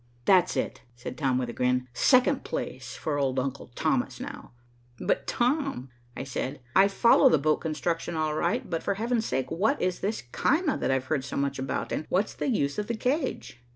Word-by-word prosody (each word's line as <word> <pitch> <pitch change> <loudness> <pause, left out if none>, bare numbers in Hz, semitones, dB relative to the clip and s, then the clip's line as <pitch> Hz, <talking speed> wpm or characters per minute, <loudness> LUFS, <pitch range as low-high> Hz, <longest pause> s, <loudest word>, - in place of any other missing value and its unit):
"That's 185 -2 +4
it," - - -2
said 120 +1 -7
Tom 135 -4 +1
with 125 -1 -1
a - - -5
grin. 125 0 +1
"Second 255 - +4
place - - -5
for 145 -2 -2
old 135 -2 0
uncle 135 +1 -2
Thomas - - 0
now." - - -8 0.5
"But - - 0
Tom," 250 - 0 0.3
I - - -3
said, 135 +1 -4 0.2
"I 195 +1 +7
follow 215 +4 +5
the 160 - +4
boat 155 +2 +2
construction 165 +1 -2
all 155 -1 0
right, 170 +3 0
but 165 -2 -2
for 200 - -1
Heaven's 230 +2 0
sake 130 -1 -2
what 210 - +1
is 180 0 0
this 210 - -2
caema 305 0 +1
that - - -1
I've 130 -1 +1
heard 135 -1 -1
so - - -5
much 140 -1 -1
about, 130 0 -3
and 155 - -3
what's 195 +4 +1
the - - -3
use 140 - 0
of 210 - -3
the 235 - -2
cage?" 255 - -2
160 Hz, 200 wpm, -27 LUFS, 135-220 Hz, 0.5 s, I